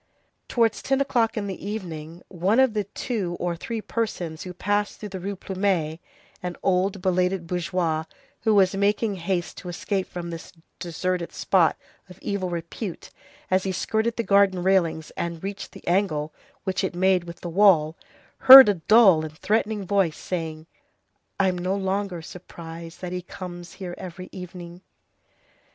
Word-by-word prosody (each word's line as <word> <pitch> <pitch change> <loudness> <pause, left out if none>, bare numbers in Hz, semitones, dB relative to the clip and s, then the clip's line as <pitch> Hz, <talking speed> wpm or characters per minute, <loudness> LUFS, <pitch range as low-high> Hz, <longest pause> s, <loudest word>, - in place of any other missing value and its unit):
Towards 225 -3 +1
ten 270 0 +1
o'clock 240 -5 +1
in 205 - -1
the 195 -2 -6
evening, 175 -5 -6
one 190 +6 +1
of 265 -4 +4
the 210 -2 -1
two 195 -4 -3
or 175 -1 -1
three 225 +6 -5
persons 180 -9 -3
who 185 -1 -6
passed 205 +3 -1
through 210 - -6
the 190 -1 -6
Rue 200 +3 -4
Plumet, 185 -5 -1 0.4
an 180 -1 -4
old, 190 +1 +1
belated 185 -1 +1
bourgeois 170 -2 -1 0.4
who 220 -2 +3
was 190 -1 +4
making 200 +1 +1
haste 175 -1 -2
to 180 - -7
escape 190 +2 -2
from 170 -1 -6
this 165 0 -8 0.3
deserted 175 0 -2
spot 175 -5 +2 0.3
of 180 - -12
evil 195 -3 -2
repute, 170 +3 -6 0.4
as 185 0 +4
he 190 - -2
skirted 220 +5 -1
the 230 - -1
garden 200 -3 +3
railings 170 -4 +1
and 170 0 -5
reached 200 +1 -5
the - - -14
angle 160 -5 0 0.3
which 190 -1 -1
it 185 -2 -2
made 185 -1 +2
with 170 0 -10
the - - -5
wall, 165 -4 +4 0.4
heard 265 -3 +12
a - - +4 0.2
dull 205 -8 +7
and 155 -1 -7
threatening 215 0 0
voice 190 -5 +1
saying:— 160 -3 -4 0.7
"I'm 190 -2 +3
no 180 +2 -1
longer 195 -3 -2
surprised 165 -1 -10
that 180 -1 -5
he 180 - -3
comes 175 -1 -9
here 180 -3 -7
every 185 0 -8
evening." 180 -1 -9
185 Hz, 160 wpm, -25 LUFS, 170-200 Hz, 0.7 s, heard